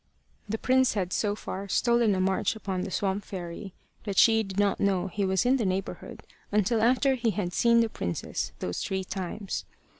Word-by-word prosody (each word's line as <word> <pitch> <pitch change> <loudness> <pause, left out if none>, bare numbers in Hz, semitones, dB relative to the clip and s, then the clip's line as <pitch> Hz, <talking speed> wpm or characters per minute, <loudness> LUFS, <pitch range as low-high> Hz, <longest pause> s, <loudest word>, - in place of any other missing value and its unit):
The 220 - -1
prince 255 0 +2
had 185 -3 -1
so 205 -1 0
far 200 -1 -6
stolen 235 0 +3
a - - -1
march 190 +3 +1
upon 195 -4 -3
the 190 - -4
swamp 195 +1 -1
fairy 185 +1 -7 0.3
that 200 -3 -4
she 225 -1 +6
did 195 -3 -6
not 205 -1 +2
know 190 -3 +1
he 200 +3 -2
was 190 +3 +1
in 260 +2 +4
the 240 - -1
neighbourhood 190 +1 -4 0.3
until 210 +2 +2
after 260 +4 +3
he 240 -3 0
had 195 -4 -2
seen 235 +3 +4
the 230 - +2
princess 85 - -3
those 90 - -3
three 190 0 -2
times. 190 +1 -4
200 Hz, 190 wpm, -28 LUFS, 190-225 Hz, 0.3 s, she